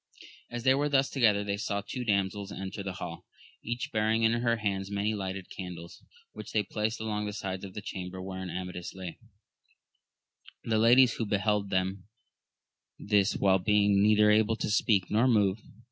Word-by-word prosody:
As 120 -1 -5
they 130 0 +5
were 145 +2 +1
thus 135 -1 +2
together, 110 -6 +3
they 100 0 -2
saw 100 -1 -2
two 125 - -4
damsels 100 -2 -1
enter 95 +1 -6
the 95 -1 -4
hall, - - -8 0.4
each 120 +1 -4
bearing 110 +1 +1
in 110 - +4
her 120 0 +1
hands 100 -3 -2
many 100 +2 -1
lighted 95 -2 -5
candles, 90 -3 -8 0.3
which - - -9
they 105 - +2
placed 110 +2 -2
along 105 -1 -2
the 105 - -4
sides 95 -2 -5
of 95 -1 -9
the 105 - -6
chamber 95 -1 -6
wherein 95 0 -6
Amadis 90 0 -6
lay; 90 -3 -7 1.4
the 110 -1 +1
ladies 120 +2 +5
who 115 - -1
beheld 105 0 0
them 95 0 -1 0.9
this 100 0 +2
while 95 -1 +3
being 100 +1 +3
neither 105 0 +5
able 110 +1 +3
to 110 - -3
speak 105 -3 +2
nor 115 +4 +3
move. 105 -4 +3
105 Hz, 175 wpm, -29 LUFS, 95-110 Hz, 1.4 s, they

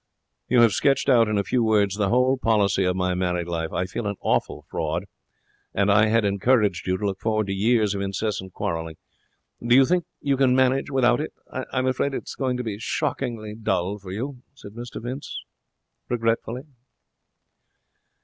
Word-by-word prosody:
'You 125 -1 +4
have 115 -2 +6
sketched 135 +7 +2
out 115 -4 +5
in 105 -1 0
a 100 - +1
few 120 +5 +1
words 105 -3 +3
the 100 -2 0
whole 125 +3 +3
policy 105 -6 +2
of 90 0 +1
my 90 -1 0
married 90 -1 -1
life. 80 -1 -3
I 90 - -1
feel 105 +4 -4
an 100 - -2
awful 75 - -1
fraud. 80 +5 -2 0.7
And 100 +1 +3
I 110 +2 +5
had 110 0 +2
encouraged 100 -2 +2
you 95 0 +1
to 105 - -3
look 95 -1 -2
forward 110 -1 0
to 95 - -3
years 105 +1 +2
of 100 - -3
incessant 100 -1 -3
quarrelling. 80 -2 -3 0.7
Do 120 +1 +4
you 135 0 +7
think 175 +2 +1
you 140 -1 0
can 130 -2 +4
manage 130 +1 +2
without 125 -2 +3
it? 155 - -5 0.2
I'm 130 0 -2
afraid 130 +2 0
it's - - -5
going 130 -2 -1
to 125 - -3
be 105 -3 -4
shockingly 115 -2 -3
dull 100 -2 -1
for 95 -2 -9
you,' 125 +6 -5
said 100 -7 -11
Mr 120 +3 -7
Vince, 125 +4 -6 0.7
regretfully. 115 +1 -1
110 Hz, 180 wpm, -24 LUFS, 95-125 Hz, 0.7 s, you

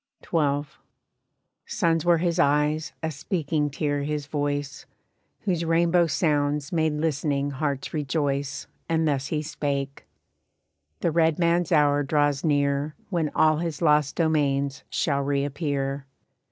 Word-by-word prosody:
XII. 145 -3 +1 1.0
"Suns 165 -2 +1
were 175 -1 +4
his 170 +1 0
eyes, 150 +1 +2
a 160 - -1
speaking 150 0 -1
tear 145 0 -1
his 150 0 -3
voice, 145 -1 -3 0.5
Whose 175 -5 -1
rainbow 170 +1 +3
sounds 145 -1 0
made 160 -2 +1
listening 145 -2 -1
hearts 140 -1 -3
rejoice 145 -2 -2 0.2
And 160 -1 +2
thus 140 -2 0
he 155 0 -2
spake: 140 -3 -3 0.9
'The 170 - +1
red 160 -1 +2
man's 170 0 +1
hour 145 -2 +4
draws 145 -1 +1
near 145 -1 +1 0.2
When 165 -4 0
all 155 -1 +4
his 165 -2 -3
lost 150 -4 +3
domains 140 -4 0
shall 140 -3 0
reappear. 140 0 -2
150 Hz, 125 wpm, -25 LUFS, 140-160 Hz, 1.0 s, were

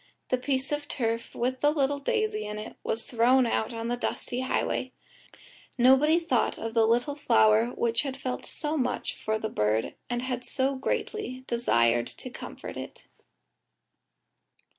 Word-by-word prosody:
The 255 - +2
piece 265 +1 -1
of 295 0 -2
turf, 230 -4 -2
with 255 +2 -1
the 295 - +5
little 285 -1 +1
daisy 435 - 0
in 210 0 -5
it, 215 - -7
was 225 - -2
thrown 250 +2 +4
out 230 0 0
on 230 0 -4
the 240 - 0
dusty 245 0 -3
highway. 260 0 -1 0.8
Nobody 265 +6 +6
thought 315 -9 +1
of 225 0 -4
the 225 -1 +4 0.3
flower 110 - +4
which 235 0 +2
had 275 -2 -4
felt 255 -2 -4
so 305 0 -2
much 250 -4 -1
for 220 0 -2
the 220 - -3
bird 105 - 0 0.2
and 245 0 -1
had 250 -1 -3
so 260 +2 0
greatly 260 - -3
desired 120 - +2
to - - -9
comfort - - -8
it. - - -8
250 Hz, 155 wpm, -28 LUFS, 225-275 Hz, 0.8 s, Nobody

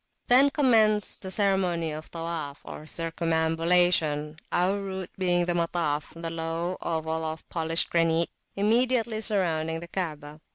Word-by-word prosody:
Then 265 +3 +6
commenced 220 -8 +3
the 190 - -6
ceremony 185 -5 +1
of 155 +1 -7
Tawaf,[FN#6] 165 -4 -5
or 155 - -8
circumambulation, 165 -1 +1
our 185 +3 +1
route 190 -2 -5
being 175 -2 +1
the 175 - 0
Matafthe 165 -3 -1
low 165 +1 -3
oval 160 -1 -2
of 160 0 -5
polished 165 0 +2
granite 165 0 +2 0.2
immediately 225 +1 +1
surrounding 165 -7 0
the 170 - -9
Kaabah. 155 -5 -5
170 Hz, 125 wpm, -27 LUFS, 160-190 Hz, 0.2 s, Then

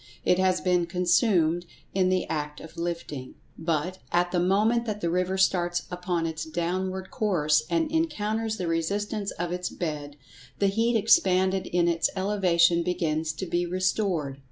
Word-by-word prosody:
It 180 - +3
has 185 -1 +2
been 180 -2 +2
consumed 175 -1 +2 0.3
in 185 -1 +2
the 185 0 0
act 150 -1 -3
of 160 0 -12
lifting. 170 -6 -5 0.2
But, 165 +3 -2
at 175 0 +2
the 180 - +1
moment 215 +6 +2
that 210 -1 -2
the 170 -4 -1
river 185 +2 0
starts 175 -2 +2
upon 180 -1 -2
its 160 -1 -3
downward 185 +3 -3
course, 160 - +2
and 325 -2 0
encounters 225 -9 -1
the 185 - -3
resistance 200 +5 -1
of 175 0 -4
its 180 0 -2
bed, 150 -4 -5 0.4
the 200 - +2
heat 230 +4 +1
expanded 190 -3 +3
in 175 -1 +1
its 170 -1 +2
elevation 180 -4 +3
begins 160 -3 -1
to 190 - -5
be 175 0 -1
restored. 180 -6 -1
180 Hz, 155 wpm, -26 LUFS, 170-195 Hz, 0.4 s, It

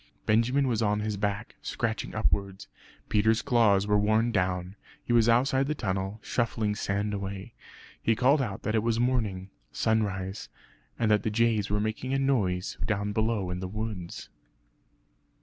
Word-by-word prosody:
Benjamin 125 +6 +3
was 115 -3 0
on 105 -1 +1
his 105 -1 -2
back, 100 +2 -3
scratching 115 -1 -3
upwards. 100 -3 -1 0.4
Peter's 110 +2 +2
claws 110 -7 +3
were 105 0 +3
worn 110 +3 +2
down; 90 -2 -1 0.3
he 120 - -1
was 115 -1 +5
outside 130 +3 +3
the 150 - -1
tunnel, 95 -1 -3
shuffling 110 -3 0
sand 105 +1 -2
away. 100 -1 -5 0.5
He 115 - +2
called 135 +5 +4
out 100 -7 -4
that 110 - -1
it 110 - +2
was 115 0 0
morning 110 -7 0 0.2
sunrise; 100 -3 -1 0.5
and 110 -2 +1
that 105 - +4
the - - -1
jays 110 -2 +1
were 105 0 +1
making 110 +5 -2
a - - +2
noise 115 -7 0
down 105 -1 -1
below 110 -4 0
in 90 - -3
the 95 - -4
woods. 105 -3 -6
105 Hz, 160 wpm, -28 LUFS, 100-115 Hz, 0.5 s, was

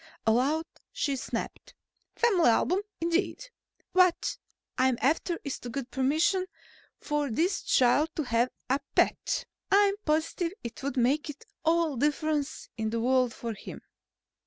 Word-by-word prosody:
Aloud 270 +8 +2 0.3
she 280 -2 -1
snapped: 260 - -5 0.4
"Family 385 - +4
album, 360 - +2 0.2
indeed! 360 +9 -1 0.4
What 365 -2 +3 0.4
I'm 255 -1 +2
after 330 +5 +1
is 280 - -4
to 245 - -7
get 260 0 -5
permission 315 +9 +2 0.5
for 295 -1 -1
this 340 - 0
child 265 +5 +3
to 310 - -1
have 240 -1 +1 0.2
a 265 +2 +2 0.2
pet. - - +1 0.2
I'm 400 0 +5
positive 320 +3 0
it 235 0 -7
would 280 0 -3
make 280 +4 +1 0.3
all 325 -4 +2
the 290 - +3
difference 300 0 -2
in 220 -1 -1
the 230 +1 -1
world 250 0 +2
to 235 - -3
him." 215 -3 -8
295 Hz, 135 wpm, -28 LUFS, 255-335 Hz, 0.5 s, I'm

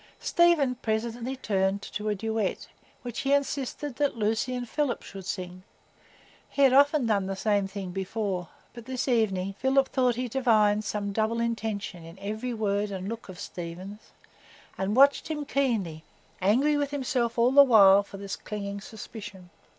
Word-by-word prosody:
Stephen 340 -7 +3
presently 235 +2 -3
turned 195 -5 0
to 210 0 -4
a 210 - 0
duet 220 -1 -2 0.4
which 240 -2 -5
he 275 +1 +1
insisted 280 -1 -2
that 285 -4 0
Lucy 225 +4 0
and 245 -1 -4
Philip 290 -1 -1
should 195 -2 -9
sing; 180 -2 -5 0.9
he 280 - +1
had 265 -2 +6
often 285 0 +5
done 200 -4 +1
the 195 - -3
same 200 0 +1
thing 195 -2 -6
before; 190 -1 -3 0.2
but 235 -1 -10
this 260 0 -3
evening 195 -6 +1
Philip 265 +1 +2
thought 250 -2 +2
he 250 +1 -2
divined 215 -4 +3
some 205 0 -2
double 220 +2 0
intention 220 -6 -3
in 165 +2 -12
every 215 +5 -4
word 210 -2 -1
and 190 -1 -5
look 230 -1 -6
of 180 - -9
Stephen's, 185 +5 -8 0.6
and 195 +3 -1
watched 275 +2 +5
him 300 -2 -3
keenly, 220 - -1 0.4
angry 260 +10 +3
with 285 -1 0
himself 255 -4 -1
all 235 +2 +4
the 280 +1 +9
while 200 -7 +7
for 200 0 -11
this 195 0 -5
clinging 200 -1 -6
suspicion. 205 -5 -10
220 Hz, 165 wpm, -27 LUFS, 195-255 Hz, 0.9 s, the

